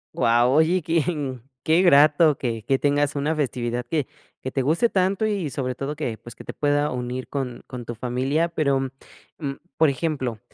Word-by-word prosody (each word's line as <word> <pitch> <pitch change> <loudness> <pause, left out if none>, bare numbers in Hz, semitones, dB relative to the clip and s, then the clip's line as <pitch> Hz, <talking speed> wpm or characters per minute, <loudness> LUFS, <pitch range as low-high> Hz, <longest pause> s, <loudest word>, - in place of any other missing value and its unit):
Guau, 120 +2 +3
oye, 165 +4 +3
quién 150 -6 -1 0.2
qué 160 +3 +4
grato 150 -2 +5
que 115 -4 -3
que 135 +4 +1
tengas 145 0 +1
una 150 +3 0
festividad 125 -4 -2
que 145 +1 -1 0.3
que 130 - -3
te 135 - 0
guste 160 - +2
tanto 195 +1 +1
y 200 -7 -1
sobre 130 -2 -2
todo 140 +3 -4
que, 120 -8 -3
pues, 120 - -11
que - - -11
te - - -6
pueda 145 0 +1
unir 125 0 -4
con 130 -4 -4
con 125 -1 -7
tu 120 0 -6
familia. 130 +7 0
Pero, 145 -5 +1 0.6
mm, 140 -4 -2 0.2
por 160 -1 +4
ejemplo, 135 -6 -2
140 Hz, 180 wpm, -24 LUFS, 125-160 Hz, 0.6 s, grato